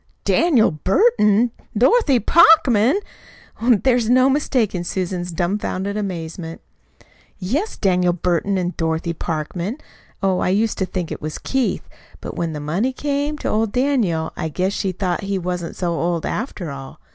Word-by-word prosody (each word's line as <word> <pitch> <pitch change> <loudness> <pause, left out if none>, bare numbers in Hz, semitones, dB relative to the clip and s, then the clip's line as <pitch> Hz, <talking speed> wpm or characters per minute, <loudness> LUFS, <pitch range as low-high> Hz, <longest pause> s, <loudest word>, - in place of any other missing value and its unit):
"Daniel 295 -10 +3
Burton 215 - +3 0.3
Dorothy 275 - +4
Parkman!" 275 - +5 0.6
There 245 +2 +3
was 235 -2 0
no 255 +2 +5
mistaking 240 -10 0
Susan's 180 0 -3
dumfounded 190 +3 -2
amazement. 165 -4 -5 0.8
"Yes, 270 - -2
Daniel 180 -3 +2
Burton 180 +3 0
an' 180 0 -1
Dorothy 165 +1 -1
Parkman. 170 - -4 0.5
Oh, 190 -1 +2
I - - 0
used 210 +4 +1
to 190 - 0
think 180 -3 -4
it - - -5
was 155 0 -4
Keith; 265 -2 -1 0.3
but - - -7
when 165 -2 -2
the 150 - -5
money 180 - -1
came 290 +2 -2
to - - -5
old 220 -1 0
Daniel 235 - 0
I 160 -2 -3
guess 185 +5 -1
she 195 -2 -1
thought 180 0 -2
he 195 -1 -2
wasn't 180 -1 -4
so 175 -2 -1
old, 170 0 -1
after 205 - -4
all. 135 -1 -9
195 Hz, 150 wpm, -20 LUFS, 175-245 Hz, 0.8 s, Parkman